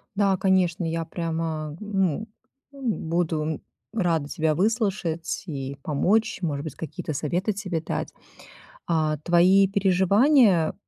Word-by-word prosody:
Да, 200 -2 +3
конечно, 185 -2 +2
я 165 0 -2
прямо, 160 -2 -3
ну, 200 -1 -1 0.4
буду 165 - -2 0.3
рада 165 -8 0
тебя 155 -2 0
выслушать 195 -6 -1
и 140 -3 -5
помочь, 195 +11 +1
может 145 -4 -2
быть, 155 - -6
какие-то 155 -1 -5
советы 175 +9 -1
себе 185 -5 -3
дать. - - -4 0.7
А, 155 -2 +1
твои 180 +4 +5
переживания 195 - +4
175 Hz, 110 wpm, -25 LUFS, 160-195 Hz, 0.7 s, твои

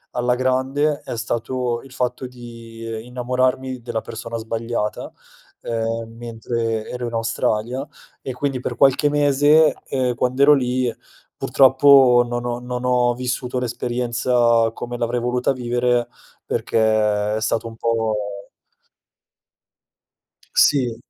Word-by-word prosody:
alla 125 0 +1
grande 130 +4 0
è 120 - -5
stato 120 +1 -2
il 135 - -15
fatto 125 0 -3
di 115 -2 -9
innamorarmi 130 +1 -1
della 115 -1 -3
persona 115 +1 -6
sbagliata, 115 -1 -3 0.5
ehm, 115 0 -3
mentre 115 -1 -3
ero 125 -1 -4
in 115 - -7
Australia 115 +3 -1 0.4
e 130 - -5
quindi 135 0 -2
per - - -4
qualche 140 +2 +4
mese, 145 +2 +4
ehm, 130 -2 0
quando 125 +3 +1
ero 150 +1 +8
lì 125 -3 0 0.4
purtroppo 130 -2 +5
non 120 0 -3
ho 120 0 -2
non 125 0 -5
ho 125 -1 +2
vissuto 125 0 -3
l'esperienza 120 -1 +1
come 120 +1 -6
l'avrei 120 +1 -1
voluta 125 +2 0
vivere, 120 -1 0 0.4
perché - - -2 0.6
è - - -4
stato 110 +1 -1
un 115 - -9
po' 115 -1 0 2.4
Sì. 125 -5 +3
125 Hz, 120 wpm, -21 LUFS, 115-130 Hz, 2.4 s, ero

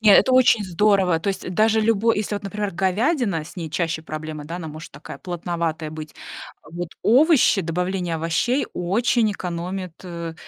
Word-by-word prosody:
Не, 215 -2 +6
это 260 - +5
очень 240 -5 +5
здорово. 190 -1 +2
То 190 +5 -3
есть, 195 - -3
даже 220 +3 +3
любой, 225 0 +2
если 210 0 -2
вот, 205 - -4
например, 205 0 -3
говядина, 195 - 0
с 175 - -13
ней 165 -2 -4
чаще 165 -1 -1
проблема, 155 -1 -6
да, 165 +4 -6
она 165 -3 -6
может 155 +2 -10
такая 145 +3 -10
плотноватая 170 -3 -3
быть. 155 -1 -8 0.6
Вот 175 +1 -5
овощи, 265 - +5
добавление 180 +1 -2
овощей 170 - 0
очень 215 +5 +1
экономит, 180 0 -4
э, 170 -2 -6
180 Hz, 165 wpm, -22 LUFS, 165-210 Hz, 0.6 s, Не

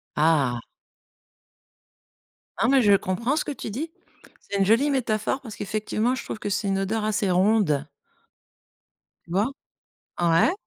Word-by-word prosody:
Ah! 145 -6 +2 2.0
Non, 225 - +3
mais 270 -1 +5
je 205 -3 +5
comprends 215 +9 -1
ce - - -1
que - - -3
tu 275 - -6
dis. 290 +10 -4 0.5
C'est 200 - -5
une 195 - +3
jolie 230 +8 +4
métaphore, 245 -1 0
parce 225 -5 -9
qu'effectivement, 215 +4 -1
je - - -6
trouve - - -6
que 205 - -3
c'est 205 +1 -1
une 195 0 +1
odeur 210 +3 -1
assez 210 -2 0
ronde. 180 -6 +2 1.4
Tu - - -13
vois? 200 +3 +3 0.8
Ouais. 170 - +4
210 Hz, 145 wpm, -25 LUFS, 185-235 Hz, 2.0 s, mais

